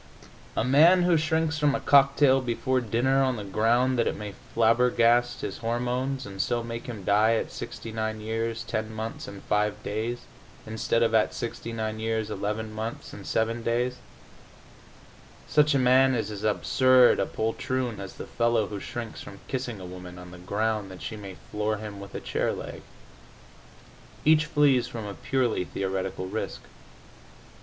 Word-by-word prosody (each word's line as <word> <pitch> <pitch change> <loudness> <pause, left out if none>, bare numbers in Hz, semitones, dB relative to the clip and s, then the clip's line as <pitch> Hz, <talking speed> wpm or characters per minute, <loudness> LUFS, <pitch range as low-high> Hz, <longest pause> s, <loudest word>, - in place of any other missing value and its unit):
A - - +2
man 160 +8 +6
who 175 -1 +4
shrinks 160 0 +1
from 145 -2 +3
a - - -1
cocktail 140 -1 +5
before 130 +1 0
dinner 120 +4 +2
on 130 -2 +2
the 105 - -5
ground 120 +5 +2
that 115 - +2
it - - -1
may 105 -1 -6 0.2
flabbergast 120 +1 +3
his - - -5
hormones, 125 +3 -1
and 95 -1 -4
so 120 +3 0
make 115 0 -6
him 110 -5 -6
die 105 +3 +4
at - - -2
69 110 -1 -5
years, 115 +1 -2
ten 110 -1 -3
months 110 +1 -5
and 100 -1 -9
five 105 0 0
days 115 +3 -3 0.4
instead 110 +1 0
of 115 -1 +1
at 110 -1 +3
69 110 -2 -4
years, 110 -1 -1
eleven 110 +1 -3
months 110 +2 -5
and 100 - -9
seven 115 +1 0
days 120 +2 0 1.5
such 150 -1 +4
a - - +5
man 130 +1 +5
is 110 -2 -2
as 105 0 -7
absurd 125 +4 +4
a - - +1
poltroon 120 +1 -2
as 95 -1 -7
the - - -8
fellow 115 -2 +1
who 100 0 -6
shrinks 120 +1 -6
from 100 -1 -10
kissing 125 -5 -3
a 95 - -8
woman 90 0 -9
on 90 0 -10
the 90 - -11
ground 105 +2 -1
that 95 -1 -10
she 110 - -5
may 100 -3 -8 0.2
floor 105 +1 -1
him 105 -1 -7
with 100 0 -10
a - - -2
chair - - -1
leg. - - -7 1.4
Each 155 0 +5
flees 140 -6 +3
from 115 -3 -6
a 100 - -5
purely 120 - 0
theoretical 95 0 -3
risk. 95 - -4
115 Hz, 165 wpm, -27 LUFS, 105-130 Hz, 1.5 s, man